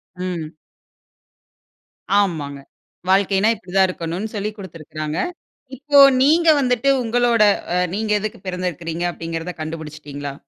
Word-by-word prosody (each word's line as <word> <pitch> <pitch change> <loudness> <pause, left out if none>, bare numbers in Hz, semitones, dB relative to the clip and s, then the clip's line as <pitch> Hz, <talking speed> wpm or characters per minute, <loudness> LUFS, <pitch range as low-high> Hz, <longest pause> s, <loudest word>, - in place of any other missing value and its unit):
ம். 180 -4 -4 1.7
ஆமாங்க. 155 -8 -2 0.5
வாழ்க்கைனா 195 +2 +3
இப்டி 185 -4 -14
தான் 190 -1 +5
இருக்கணுனு 175 +4 -4
சொல்லிக் 210 +1 -4
குடுத்திருக்குறாங்க. 155 -4 -6 0.6
இப்போ 285 +2 +3 0.2
நீங்க 320 +5 +4
வந்துட்டு 250 0 +1
உங்களோட 235 -1 +3 0.3
அ - - +1 0.2
நீங்க 215 0 -2
எதுக்கு 215 +2 -5
பிறந்திருக்கிறீங்க? 175 -2 -3
அப்டீங்கிறத 165 +1 -5
கண்டுபிடிச்சிடீங்களா? 150 -3 -6
185 Hz, 105 wpm, -20 LUFS, 160-215 Hz, 1.7 s, தான்